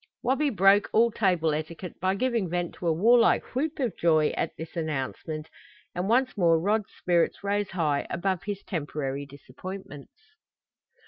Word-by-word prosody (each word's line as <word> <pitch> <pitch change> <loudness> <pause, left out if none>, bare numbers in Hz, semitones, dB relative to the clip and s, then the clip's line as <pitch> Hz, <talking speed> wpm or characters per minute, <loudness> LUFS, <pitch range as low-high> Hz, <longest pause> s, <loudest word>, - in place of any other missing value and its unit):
Wabi 270 +4 +2
broke 200 -1 +4
all 235 +1 +4
table 180 -7 +1
etiquette 160 +4 -6
by 190 +1 +1
giving 230 -4 0
vent 175 0 -2
to 175 - -5
a - - +4
warlike 230 +8 +4
whoop 295 +5 -1
of 250 -7 -1
joy 155 -3 +3
at - - -2
this 160 +2 -8
announcement, 155 0 -4 0.5
and 180 +3 -2
once 255 +3 +2
more 170 -5 +4
Rod's 210 +4 0
spirits 175 +1 +1
rose 205 0 0
high 155 -6 0
above 185 -1 -1
his 200 -1 -4
temporary 145 -4 -4
disappointments. 145 +3 -10
180 Hz, 150 wpm, -27 LUFS, 160-210 Hz, 0.5 s, broke